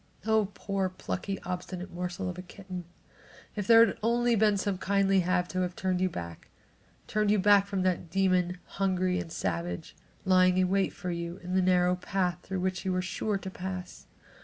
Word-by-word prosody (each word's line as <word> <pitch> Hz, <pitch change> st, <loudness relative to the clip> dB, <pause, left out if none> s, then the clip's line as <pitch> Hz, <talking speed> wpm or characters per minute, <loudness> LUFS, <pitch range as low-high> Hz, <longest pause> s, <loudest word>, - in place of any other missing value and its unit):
Oh, 220 Hz, -2 st, +2 dB
poor, 195 Hz, -2 st, -1 dB
plucky, 190 Hz, +1 st, -4 dB
obstinate 180 Hz, 0 st, -5 dB
morsel 180 Hz, +2 st, -4 dB
of 180 Hz, 0 st, -5 dB
a -, -, -4 dB
kitten! 185 Hz, -1 st, -8 dB, 0.7 s
If 205 Hz, -2 st, -3 dB
there 230 Hz, 0 st, +8 dB
had -, -, -4 dB
only 240 Hz, +2 st, +2 dB
been 210 Hz, -2 st, +3 dB
some 195 Hz, -1 st, -1 dB
kindly 195 Hz, 0 st, +2 dB
hand 180 Hz, 0 st, +1 dB
to 185 Hz, -, -1 dB
have 180 Hz, -1 st, -2 dB
turned 185 Hz, -1 st, -1 dB
you 185 Hz, -, +2 dB
back; 85 Hz, -, -8 dB, 0.6 s
turned 210 Hz, -1 st, 0 dB
you 210 Hz, -, +4 dB
back 200 Hz, 0 st, +5 dB
from 195 Hz, -2 st, -1 dB
that 180 Hz, -2 st, 0 dB
demon, 180 Hz, -1 st, +1 dB
hungry 185 Hz, -1 st, 0 dB
and 175 Hz, -4 st, -6 dB
savage, 85 Hz, -, -3 dB, 0.3 s
lying 185 Hz, -1 st, +5 dB
in 185 Hz, -1 st, +3 dB
wait 195 Hz, 0 st, +2 dB
for 180 Hz, -, -5 dB
you 170 Hz, +1 st, -4 dB
in 180 Hz, +1 st, -4 dB
the 190 Hz, -, +3 dB
narrow 180 Hz, 0 st, +3 dB
path 180 Hz, -1 st, -1 dB
through 190 Hz, -1 st, -4 dB
which 185 Hz, 0 st, -1 dB
you 190 Hz, -, -1 dB
were 185 Hz, 0 st, 0 dB
sure 200 Hz, +2 st, -1 dB
to 190 Hz, -1 st, -7 dB
pass! 185 Hz, -1 st, -6 dB
185 Hz, 190 wpm, -29 LUFS, 180-195 Hz, 0.7 s, there